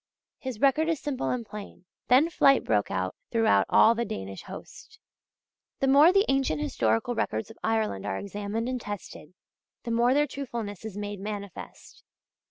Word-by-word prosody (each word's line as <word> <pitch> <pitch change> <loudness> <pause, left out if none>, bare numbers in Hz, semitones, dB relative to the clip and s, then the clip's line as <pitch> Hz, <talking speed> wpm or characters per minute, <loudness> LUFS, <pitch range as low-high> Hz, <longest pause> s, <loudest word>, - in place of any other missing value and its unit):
His 260 -5 -6
record 285 +5 +3
is 325 -3 0
simple 280 -3 -3
and 245 -2 -2
plain: 210 -3 -10 0.2
"Then 280 +7 +5
flight 275 -4 +4
broke 105 -2 +1
out 95 0 -2 0.2
throughout 225 -1 +3
all 225 - +6
the 235 0 -1
Danish 95 - -6
host." - - -11 0.8
The - - +1
more 285 +5 +7
the 395 +2 +4
ancient 270 - +1
historical 115 - 0
records 110 - -2
of 225 - -17
Ireland 215 - -1
are 95 -2 -2
examined 205 +3 -4
and 255 -1 -3
tested, 200 -5 -8 0.5
the 235 - -4
more 240 +3 +3
their 295 +1 +4
truthfulness 235 -8 -6
is 210 -3 -6
made 205 -1 -5
manifest. 200 -2 -8
225 Hz, 165 wpm, -27 LUFS, 200-265 Hz, 0.8 s, more